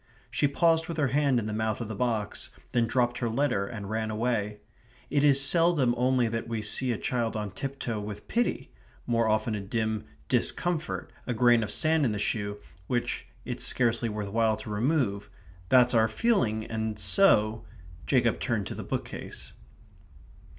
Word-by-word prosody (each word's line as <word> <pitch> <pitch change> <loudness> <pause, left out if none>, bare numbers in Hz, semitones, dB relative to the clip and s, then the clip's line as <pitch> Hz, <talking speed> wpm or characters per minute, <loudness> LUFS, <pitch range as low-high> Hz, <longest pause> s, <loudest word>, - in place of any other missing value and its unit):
She 145 - +2
paused 165 +3 +2
with 170 - -5
her 145 -4 +2
hand 140 -1 +2
in 115 - -1
the 105 - -3
mouth 110 -1 -1
of 120 - -4
the 110 - -5
box; 110 -1 -2 0.2
then 120 -1 +2
dropped 120 0 +1
her 120 - 0
letter 115 -5 0
and 105 -3 -6
ran 110 +1 -2
away. 105 -2 -1 0.5
It 145 -1 +2
is 140 -2 +5
seldom 150 -3 +3
only 125 0 +2
that 115 0 -3
we 115 -2 -3
see 125 +4 0
a 115 - -1
child 120 -1 -1
on 105 -2 -3
tiptoe 120 0 -4
with 105 0 -7
pity 240 +1 -1 0.3
more 115 -1 +2
often 110 +1 +1
a 105 - -2
dim 110 +1 -2 0.2
discomfort, 160 +6 0
a 125 - -1
grain 120 0 +5
of 105 - -3
sand 155 +8 +2
in 115 -5 +1
the - - -2
shoe 105 0 -2 0.3
which 120 -1 -2 0.2
it's - - -3
scarcely 120 -1 +1
worth 105 -1 -4
while 110 0 +2
to 105 - -8
remove 105 -4 0 0.4
that's 125 -1 +5
our 110 -1 +4
feeling, 110 - +1
and 110 -1 -3
so 110 - +3 0.4
Jacob 120 -4 +2
turned 115 -6 -1
to - - -5
the - - -6
bookcase. - - -5
115 Hz, 175 wpm, -28 LUFS, 110-130 Hz, 0.5 s, is